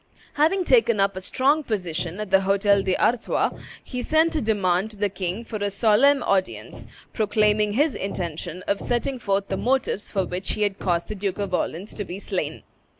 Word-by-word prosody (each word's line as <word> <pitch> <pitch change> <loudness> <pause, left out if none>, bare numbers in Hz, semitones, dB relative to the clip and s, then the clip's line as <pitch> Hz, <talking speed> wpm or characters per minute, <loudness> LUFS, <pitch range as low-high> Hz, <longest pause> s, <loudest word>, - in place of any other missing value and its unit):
Having 340 +6 +2
taken 290 - +4
up 195 -1 +2
a 190 - -5
strong 275 +10 +2
position 180 - -3
at 210 -3 -5
the 195 0 +5
Hotel 200 +1 +3
d'Artois, 195 +5 +1 0.3
he 250 -2 -5
sent 320 +4 +2
a 305 - +1
demand 200 -3 +1
to 215 - -13
the 205 0 0
king 190 +3 -4
for 220 - -5
a 205 -1 -1
solemn 230 +7 +4
audience, 190 -1 -2 0.3
proclaiming 210 -1 +2
his 290 +4 +2
intention 175 -2 -4
of 200 - 0
setting 250 +2 -1
forth 200 -2 -1
the 195 - -1
motives 250 -4 0
for 195 -2 0
which 180 +2 -4
he 210 - -1
had 200 -1 -1
caused 170 -2 0
the - - -4
Duke 195 -2 -3
of 200 -2 -3
Orleans 180 +3 -2
to 205 - -4
be 185 -1 -7
slain. 200 - -4
205 Hz, 190 wpm, -24 LUFS, 190-235 Hz, 0.3 s, the